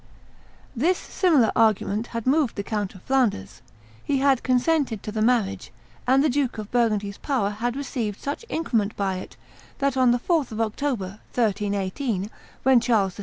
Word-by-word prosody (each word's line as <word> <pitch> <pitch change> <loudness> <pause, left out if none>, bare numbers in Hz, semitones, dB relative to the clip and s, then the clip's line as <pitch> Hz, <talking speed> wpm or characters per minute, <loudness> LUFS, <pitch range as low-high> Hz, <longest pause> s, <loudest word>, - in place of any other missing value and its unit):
This 330 +10 +2
singular 310 - +2
argument 220 0 +2
had 230 -2 -5
moved 275 -2 +2
the 200 - -3
Count 205 -2 -3
of 185 - -14
Flanders; 195 - 0 0.4
he 280 - 0
had 270 -2 +3
consented 255 -3 +1
to 210 - -5
the 215 0 -2
marriage; 225 -4 +1 0.4
and 265 +2 +4
the - - +4
Duke 265 -3 0
of 215 -1 -7
Burgundy's 210 -4 0
power 250 -8 0
had 235 +4 -2
received 245 -7 -3
such 285 +10 -4
increment 225 - -1
by 195 -2 -1
it 185 - -9 0.4
that 275 -1 0
on 255 -1 +4
the 240 - +4
4th 305 +1 0
of 220 - -5
October, 220 -3 -2 0.2
1380, 205 0 -1 0.3
when 265 -1 +6
Charles 215 -6 +1
VI. - - -12
230 Hz, 170 wpm, -24 LUFS, 205-265 Hz, 0.4 s, when